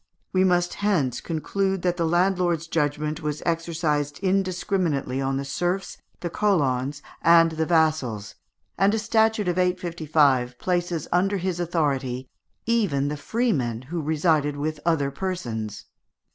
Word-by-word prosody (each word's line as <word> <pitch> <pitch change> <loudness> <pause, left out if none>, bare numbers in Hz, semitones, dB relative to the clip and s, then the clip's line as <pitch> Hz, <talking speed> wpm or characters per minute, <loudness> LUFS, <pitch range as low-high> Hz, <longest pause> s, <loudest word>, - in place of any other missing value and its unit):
We 185 0 +4
must 175 -1 +2
hence 155 - 0
conclude 190 +3 -1
that 180 -1 +1
the 170 -2 0
landlord's 175 -1 +1
judgment 150 0 -1
was 150 -1 -3
exercised 160 -4 -1
indiscriminately 185 -7 0
on 135 0 0
the 140 - -3
serfs, 175 +7 -2 0.2
the 175 - -2
colons, 145 -9 0 0.2
and 165 0 +6
the 160 0 -1
vassals, 155 -11 +1 0.5
and 200 +3 +4
a - - 0
statute 220 -2 +2
of 180 +1 0
855 155 -8 +1
places 175 -2 -1
under 195 +3 +2
his 180 -1 -2
authority 140 -7 -1 0.4
even 195 -12 +1
the 150 - -2
freemen 145 - -1
who 165 +5 -4
resided 150 -1 +1
with 155 +1 -3
other 145 -5 +2
persons. 120 - -4
165 Hz, 130 wpm, -24 LUFS, 145-185 Hz, 0.5 s, and